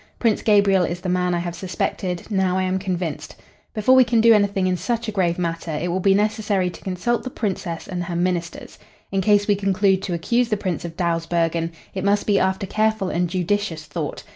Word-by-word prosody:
Prince 225 -3 +1
Gabriel 200 -3 +4
is 175 +1 -2
the 185 - -3
man 180 0 +1
I - - 0
have 175 0 -3
suspected. 180 0 -3
Now 190 -2 +1
I 190 - +1
am 185 0 0
convinced. 180 -5 -4 0.4
Before 215 +4 +3
we 260 - +8
can 235 -1 +1
do 230 +1 +7
anything 200 -2 +2
in 185 0 +1
such 235 +4 -2
a - - -1
grave 180 -4 0
matter 170 -1 -3
it 175 - -2
will 180 +2 0
be 195 +1 +3
necessary 210 -3 0
to - - -13
consult 190 +6 -1
the 255 - -5
Princess 185 -8 -4
and 180 -1 -4
her 175 -1 -4
ministers. 175 -1 -3 0.3
In 195 -1 +1
case 205 0 +3
we 205 - +4
conclude 195 -1 +2
to 185 -3 -3
accuse 235 +8 +1
the 215 - +1
Prince 185 -5 -3
of 165 -1 -8
Dawsbergen, 165 -1 0 0.2
it 190 - -4
must 200 +1 +2
be 205 -2 +3
after 190 +1 0
careful 215 -1 0
and 175 +1 0
judicious 180 -2 -1
thought. - - -5
190 Hz, 215 wpm, -22 LUFS, 175-205 Hz, 0.4 s, we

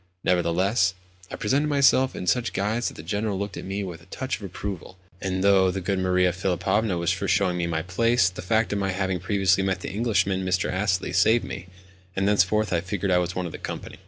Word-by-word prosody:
Nevertheless, 90 +2 +2 0.3
I - - -5
presented 140 +8 +1
myself 135 -2 +3
in - - -5
such 115 +7 +1
guise 110 +5 -1
that - - -5
the 75 - -9
General 100 +3 -2
looked 100 +1 -4
at - - -7
me 100 +2 -3
with 85 -3 -7
a 85 - -19
touch 130 +7 -4
of - - -18
approval; 95 -1 -6 0.2
and, 95 -1 -2
though 95 -2 +5
the 95 +1 -2
good 95 +1 -1
Maria 90 -1 +2
Philipovna 95 +2 0
was 85 0 +1
for 95 +2 -2
showing 95 -2 +2
me 85 -1 -1
my 80 -1 -2
place, 115 +4 +2
the 95 - -5
fact 110 +4 +1
of 100 - -1
my 95 -1 -1
having 95 -1 -1
previously 95 -2 +2
met 95 -1 -1
the - - -5
Englishman, 95 -3 0
Mr. 95 0 0
Astley, 95 -2 0
saved 110 +7 +4
me, 90 - -7 0.5
and 95 +1 +1
thenceforward 105 +1 +2
I 85 - +1
figured 95 +1 -2
as 90 0 +1
one 90 - -2
of 85 - -5
the - - -8
company. - - -7
95 Hz, 220 wpm, -25 LUFS, 90-105 Hz, 0.5 s, though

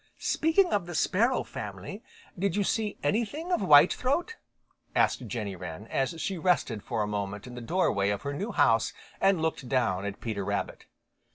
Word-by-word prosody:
"Speaking 345 +3 +2
of 195 -4 0
the 175 - -6
sparrow 230 +11 +2
family, - - -7 0.3
did 190 -1 -1
you 205 - +2
see 210 +1 -1
anything 240 - -1
of 355 - +2
Whitethroat?" 340 - +4 0.6
asked 125 - +2
Jenny 105 -2 -4
Wren, 90 +2 -7
as 135 +5 -1
she 190 +2 -2
rested 155 - +1
for 110 - -2
a - - -2
moment 105 0 -4
in 125 - -9
the 125 - -7
doorway 115 - +1
of 100 -1 -2
her 140 0 -3
new 200 +11 -3
house 115 -1 +3 0.3
and 195 -2 +3
looked 155 -6 -2
down 110 -8 +1
at 100 -1 -5
Peter 110 -4 -3
Rabbit. - - -3
145 Hz, 175 wpm, -28 LUFS, -, 0.6 s, Whitethroat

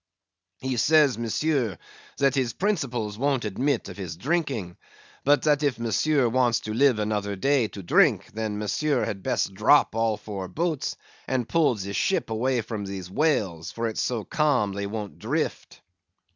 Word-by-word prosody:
"He 130 -1 -2
says, 145 -3 +4
Monsieur, 120 - 0 0.4
that 140 -2 +3
his 130 -4 0
principles 125 - -2
won't 135 -3 +1
admit 125 +6 -1
of - - -9
his 90 -4 -6
drinking; 130 - -2 0.5
but 145 +1 +3
that 150 -1 +3
if 140 -5 +1
Monsieur 125 +4 +1
wants 120 -1 +2
to 110 - -5
live 130 0 +4
another 105 -1 -1
day 135 +3 +2
to 100 -2 -9
drink, 85 - +3
then 110 -1 -3
Monsieur 130 +6 0
had 100 -2 -4
best 95 - -1
drop 110 +9 +4
all 115 -1 +1
four 100 -3 -6
boats, 160 - -2 0.3
and 125 -3 -1
pull 160 -7 +3
the 100 -1 -5
ship 190 - 0
away 120 +2 +1
from 110 -1 -5
these 95 -2 -6
whales, 100 - 0
for 115 0 -2
it's 110 - -2
so 115 -3 -1
calm 130 - +1
they 100 0 -3
won't 105 -1 -6
drift." - - -3
115 Hz, 165 wpm, -25 LUFS, 105-140 Hz, 0.5 s, says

